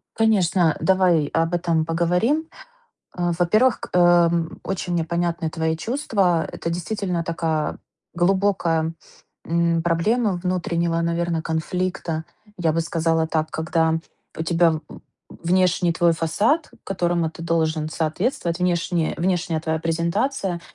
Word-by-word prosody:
Конечно, 190 Hz, -7 st, +3 dB
давай 180 Hz, -5 st, +3 dB
об 165 Hz, +1 st, +1 dB
этом 165 Hz, -2 st, +1 dB
поговорим. 180 Hz, -, +1 dB, 0.7 s
А, 175 Hz, -1 st, -1 dB
во-первых, 215 Hz, +8 st, +3 dB
к -, -, -8 dB
ам, 170 Hz, -2 st, +3 dB
очень 180 Hz, -2 st, -3 dB
мне 165 Hz, -2 st, +1 dB
понятны 170 Hz, 0 st, -1 dB
твои 160 Hz, 0 st, -1 dB
чувства. 195 Hz, -, 0 dB
Это 170 Hz, -, -4 dB
действительно 180 Hz, 0 st, -2 dB
такая 160 Hz, -2 st, -2 dB, 0.4 s
глубокая, 175 Hz, -3 st, +1 dB, 0.5 s
м, 170 Hz, 0 st, +1 dB
проблема 200 Hz, +6 st, +1 dB
внутреннего, 170 Hz, -2 st, 0 dB
наверно, 170 Hz, -1 st, -1 dB
конфликта. 165 Hz, 0 st, -2 dB, 0.3 s
Я 165 Hz, -2 st, +1 dB
бы 165 Hz, -, 0 dB
сказала 165 Hz, -1 st, 0 dB
так: 155 Hz, -1 st, -1 dB
когда 160 Hz, 0 st, +1 dB, 0.4 s
у 160 Hz, -, -2 dB
тебя 165 Hz, 0 st, +3 dB
в 155 Hz, -, -3 dB, 0.6 s
внешний 180 Hz, -1 st, +2 dB
твой 170 Hz, 0 st, +3 dB
фасад, 210 Hz, -, +1 dB
которому 175 Hz, -3 st, 0 dB
ты 165 Hz, -, -13 dB
должен 160 Hz, -2 st, 0 dB
соответствовать, 170 Hz, -, -1 dB
внешне 175 Hz, -2 st, 0 dB
внешняя 175 Hz, -2 st, 0 dB
твоя 160 Hz, 0 st, -1 dB
презентация 170 Hz, -, -1 dB
170 Hz, 120 wpm, -22 LUFS, 165-180 Hz, 0.7 s, Конечно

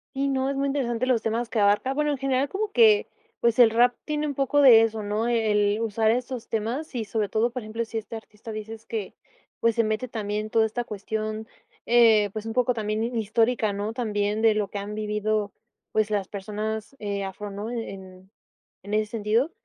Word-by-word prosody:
¿Sí, 275 Hz, +1 st, 0 dB
no? 270 Hz, 0 st, 0 dB
Es 275 Hz, -, -2 dB
muy 275 Hz, +1 st, 0 dB
interesante 255 Hz, -4 st, -1 dB
los 250 Hz, -3 st, +2 dB
temas 230 Hz, +2 st, -1 dB
que 225 Hz, -, -1 dB
abarca. 205 Hz, +6 st, +3 dB
Bueno, 300 Hz, +1 st, 0 dB
en 285 Hz, -, -1 dB
general 270 Hz, +1 st, 0 dB
como 415 Hz, +1 st, -2 dB
que, 435 Hz, -1 st, +5 dB, 0.3 s
pues, 235 Hz, 0 st, +2 dB
el 240 Hz, -2 st, +8 dB
rap 240 Hz, +2 st, +4 dB
tiene 300 Hz, 0 st, -1 dB
un 290 Hz, -, -2 dB
poco 275 Hz, +1 st, +1 dB
de 240 Hz, -5 st, +9 dB
eso, 225 Hz, -1 st, 0 dB
¿no? 210 Hz, +3 st, -1 dB
E 225 Hz, -3 st, +1 dB
el 205 Hz, 0 st, +2 dB
usar 220 Hz, 0 st, +1 dB
esos 245 Hz, +1 st, -2 dB
temas 235 Hz, +7 st, -3 dB
y, 230 Hz, -3 st, -2 dB
sobre 210 Hz, -1 st, -1 dB
todo, 225 Hz, +4 st, +1 dB
por 250 Hz, +1 st, -5 dB
ejemplo, 225 Hz, +2 st, -4 dB
si 225 Hz, 0 st, -3 dB
este 220 Hz, +1 st, -9 dB
artista 220 Hz, 0 st, -10 dB
dices 220 Hz, +1 st, -8 dB
que, 215 Hz, -4 st, -4 dB, 0.5 s
pues, 230 Hz, -1 st, +2 dB
se 230 Hz, -, +3 dB
mete 220 Hz, +3 st, -1 dB
también 215 Hz, -2 st, -3 dB
toda 225 Hz, 0 st, +3 dB
esta 230 Hz, +3 st, -2 dB
cuestión, 215 Hz, +1 st, -4 dB, 0.4 s
eh, 225 Hz, -4 st, +5 dB
pues, 220 Hz, 0 st, -5 dB
un 225 Hz, -, -3 dB
poco 250 Hz, 0 st, +2 dB
también 215 Hz, -1 st, -2 dB
hi 235 Hz, 0 st, -2 dB
histórica, 225 Hz, 0 st, +1 dB
¿no?, 205 Hz, +2 st, -3 dB
también 210 Hz, -3 st, -1 dB
de 225 Hz, -1 st, +4 dB
lo 210 Hz, -1 st, 0 dB
que 205 Hz, -, -4 dB
han 205 Hz, +1 st, -6 dB
vivido, 210 Hz, -1 st, -1 dB, 0.4 s
pues, 215 Hz, -1 st, +1 dB
las 205 Hz, -3 st, -1 dB
personas, 215 Hz, +4 st, -5 dB
eh, 200 Hz, -1 st, -3 dB
afro, 200 Hz, +2 st, -6 dB
¿no?, 205 Hz, +3 st, -5 dB
en 190 Hz, -5 st, -7 dB, 0.5 s
en 205 Hz, +2 st, -7 dB
ese 215 Hz, 0 st, +2 dB
sentido. 230 Hz, +7 st, +1 dB
220 Hz, 210 wpm, -25 LUFS, 210-240 Hz, 0.5 s, de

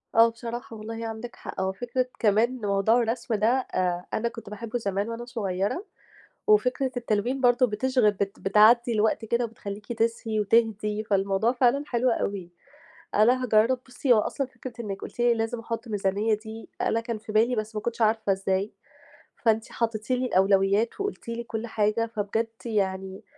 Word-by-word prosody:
آه، 230 Hz, +1 st, +7 dB
بصراحة 230 Hz, 0 st, -7 dB
والله 225 Hz, +1 st, -6 dB
عندِك 225 Hz, +2 st, -7 dB
حق. -, -, -6 dB
هو 190 Hz, 0 st, 0 dB
فكرة 245 Hz, +5 st, -2 dB
كمان 230 Hz, +4 st, +2 dB
موضوع 205 Hz, +3 st, +3 dB
الرسم 230 Hz, 0 st, -1 dB
ده 210 Hz, +1 st, +2 dB
أ 185 Hz, -8 st, 0 dB
أنا 235 Hz, +2 st, 0 dB
كنت 230 Hz, -3 st, -10 dB
باحبّه 220 Hz, +3 st, -4 dB
زمان 200 Hz, 0 st, -2 dB
وأنا 230 Hz, +1 st, -5 dB
صغيرة 210 Hz, -, -2 dB, 0.6 s
وفكرة 270 Hz, -10 st, +3 dB
التلوين 240 Hz, +3 st, -1 dB
برضه 245 Hz, 0 st, +4 dB
بتشغِل 240 Hz, 0 st, +2 dB
بت 200 Hz, 0 st, -3 dB
بتعدّي 225 Hz, +4 st, +5 dB
الوقت 220 Hz, +1 st, +1 dB
كده 235 Hz, +2 st, +1 dB
وبتخلّيكِ 210 Hz, -1 st, -7 dB
تسهي 225 Hz, -1 st, -1 dB
وتهدي، 215 Hz, 0 st, +1 dB
فالموضوع 200 Hz, +1 st, +1 dB
فعلًا 255 Hz, +2 st, +2 dB
حلو 245 Hz, +1 st, +1 dB
أوي. 200 Hz, -6 st, -2 dB, 0.7 s
أنا 245 Hz, +5 st, +4 dB
هاجرَّب 230 Hz, +2 st, +3 dB
بُصّي، 250 Hz, +1 st, +2 dB
هو 220 Hz, -, +5 dB
أصلًا 270 Hz, +5 st, -2 dB
فكرة 255 Hz, -1 st, -9 dB
إنِّك 200 Hz, -3 st, -5 dB
قُلتِ -, -, -9 dB
لي 240 Hz, 0 st, +4 dB
لازم 225 Hz, +1 st, -2 dB
أحُط 230 Hz, +1 st, -5 dB
ميزانية 205 Hz, +1 st, 0 dB
دي 220 Hz, +1 st, -6 dB
أنا 230 Hz, -, +1 dB
كان 230 Hz, -1 st, -4 dB
في 215 Hz, 0 st, -9 dB
بالي 225 Hz, +4 st, +3 dB
بس 215 Hz, 0 st, -4 dB
ما 210 Hz, -, -2 dB
كنتش 235 Hz, +1 st, -4 dB
عارفة 220 Hz, -1 st, +2 dB
إزاي، 195 Hz, +1 st, -1 dB, 0.7 s
فأنتِ 225 Hz, -1 st, +2 dB
حطّيتِ 225 Hz, -1 st, -2 dB
لي 255 Hz, 0 st, +1 dB
الأولويّات 195 Hz, -, +2 dB
وقُلتِ 400 Hz, -11 st, -4 dB
لي 230 Hz, 0 st, -3 dB
كل 230 Hz, 0 st, -5 dB
حاجة، 215 Hz, +1 st, +1 dB
فبجد 220 Hz, 0 st, -2 dB, 0.2 s
يعني 190 Hz, -3 st, -2 dB
225 Hz, 165 wpm, -26 LUFS, 210-240 Hz, 0.7 s, آه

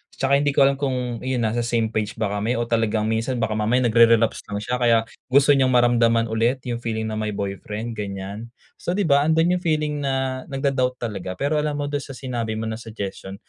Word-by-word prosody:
'Tsaka 140 Hz, +1 st, +2 dB
hindi 145 Hz, 0 st, +1 dB
ko 140 Hz, -, +6 dB
alam 135 Hz, 0 st, +4 dB
kung 125 Hz, -4 st, -2 dB
iyun 130 Hz, -2 st, -1 dB
nasa 110 Hz, +2 st, 0 dB
same 115 Hz, -1 st, 0 dB
page 105 Hz, -1 st, -2 dB
ba 110 Hz, -, +1 dB
kami 115 Hz, +4 st, 0 dB
o -, -, +1 dB
talagang 115 Hz, -2 st, +1 dB
minsan 115 Hz, +3 st, -1 dB
baka 110 Hz, -2 st, 0 dB
mamaya 115 Hz, +4 st, +1 dB
nagre-relapse 115 Hz, -1 st, +4 dB
lang 100 Hz, -, -2 dB
siya 125 Hz, +2 st, -1 dB
kaya 115 Hz, -2 st, +4 dB, 0.3 s
gusto 140 Hz, +2 st, +5 dB
niyang 135 Hz, -2 st, +4 dB
maramdaman 115 Hz, -1 st, +3 dB
ulit 120 Hz, +3 st, 0 dB
'yung 120 Hz, -1 st, -2 dB
feeling 110 Hz, -1 st, -2 dB
na 110 Hz, 0 st, -3 dB
may 110 Hz, -1 st, -2 dB
boyfriend 105 Hz, +3 st, -4 dB
ganyan. 100 Hz, +2 st, -5 dB, 0.3 s
So 175 Hz, -, -2 dB
'di 205 Hz, -, +1 dB
ba, 145 Hz, -1 st, +3 dB
andun 165 Hz, +3 st, +3 dB
'yung 180 Hz, -, -4 dB
feeling 150 Hz, -2 st, 0 dB
na 135 Hz, -2 st, -1 dB
nag-do-doubt 135 Hz, -2 st, 0 dB
talaga. 100 Hz, -5 st, -4 dB
Pero 145 Hz, +5 st, 0 dB
alam 150 Hz, -1 st, -1 dB
mo 145 Hz, 0 st, -2 dB
doon 145 Hz, -, 0 dB
sa 135 Hz, -1 st, -9 dB
sinabi 120 Hz, -4 st, -3 dB
mo 110 Hz, -, -3 dB
na 110 Hz, 0 st, -4 dB
suggestion, 100 Hz, -3 st, -7 dB
120 Hz, 215 wpm, -23 LUFS, 110-135 Hz, 0.3 s, ko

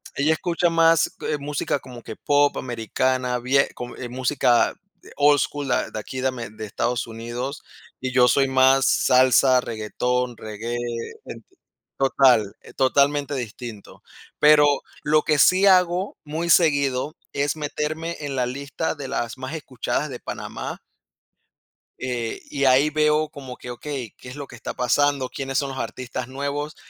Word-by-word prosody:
Ella 150 Hz, +3 st, +2 dB
escucha 175 Hz, +2 st, 0 dB
más, 165 Hz, 0 st, +3 dB
eh, 150 Hz, -, -1 dB
música 145 Hz, 0 st, -2 dB
como 125 Hz, -3 st, -11 dB
que 110 Hz, -, -8 dB
pop 145 Hz, 0 st, +2 dB
americana, 125 Hz, +1 st, -1 dB
vie 135 Hz, +3 st, +2 dB
co 120 Hz, 0 st, -7 dB
eh, 125 Hz, -, -6 dB
música 125 Hz, -1 st, +2 dB, 0.3 s
de -, -, -16 dB
old 145 Hz, 0 st, +5 dB
school, 145 Hz, 0 st, -2 dB
de 125 Hz, -, -1 dB
aquí, 130 Hz, +4 st, -6 dB
de 130 Hz, -, +1 dB
Ame 120 Hz, -4 st, -4 dB
de 110 Hz, +1 st, -8 dB
Estados 120 Hz, +4 st, -2 dB
Unidos, 120 Hz, +5 st, -6 dB, 0.4 s
y 130 Hz, 0 st, -2 dB
yo 125 Hz, -1 st, +5 dB
soy 135 Hz, +3 st, +3 dB
más 130 Hz, 0 st, +4 dB
salsa, 130 Hz, -1 st, +4 dB
reguetón, 125 Hz, +2 st, -2 dB
reggae, 110 Hz, +2 st, -5 dB, 0.5 s
ente -, -, -11 dB, 0.4 s
total, 130 Hz, -6 st, +3 dB
e -, -, -15 dB
totalmente 140 Hz, +1 st, +2 dB
distinto. 120 Hz, -3 st, -8 dB, 0.4 s
Pero, 150 Hz, 0 st, +7 dB, 0.4 s
lo 155 Hz, +1 st, +3 dB
que 155 Hz, -, +2 dB
sí 185 Hz, +6 st, +5 dB
hago, 180 Hz, 0 st, +3 dB
muy 160 Hz, +3 st, -3 dB
seguido, 140 Hz, -4 st, +3 dB, 0.2 s
es 145 Hz, +1 st, 0 dB
meterme 155 Hz, +2 st, -3 dB
en 145 Hz, -2 st, -4 dB
la 125 Hz, -1 st, +1 dB
lista, 140 Hz, +6 st, -3 dB
de 140 Hz, -3 st, -7 dB
las 120 Hz, +2 st, -3 dB
más 130 Hz, +3 st, -6 dB
escuchadas 135 Hz, -6 st, -3 dB
de -, -, -7 dB
Panamá -, -, -6 dB, 1.2 s
eh, 120 Hz, -3 st, -3 dB
y 140 Hz, -, -2 dB
ahí 135 Hz, +3 st, +5 dB
veo 155 Hz, 0 st, +2 dB
como 135 Hz, -5 st, -9 dB
que, 125 Hz, -, -8 dB
okey, 125 Hz, -1 st, -6 dB
¿qué 125 Hz, -, -11 dB
es 125 Hz, -, -9 dB
lo 140 Hz, -1 st, -6 dB
que -, -, -12 dB
está 115 Hz, -, -6 dB
pasando? 140 Hz, +2 st, +1 dB
¿Quiénes 135 Hz, -1 st, -3 dB
son 140 Hz, -2 st, 0 dB
los 135 Hz, -, -7 dB
artistas 125 Hz, 0 st, -5 dB
nuevos? 140 Hz, +3 st, -4 dB
135 Hz, 160 wpm, -23 LUFS, 125-145 Hz, 1.2 s, Pero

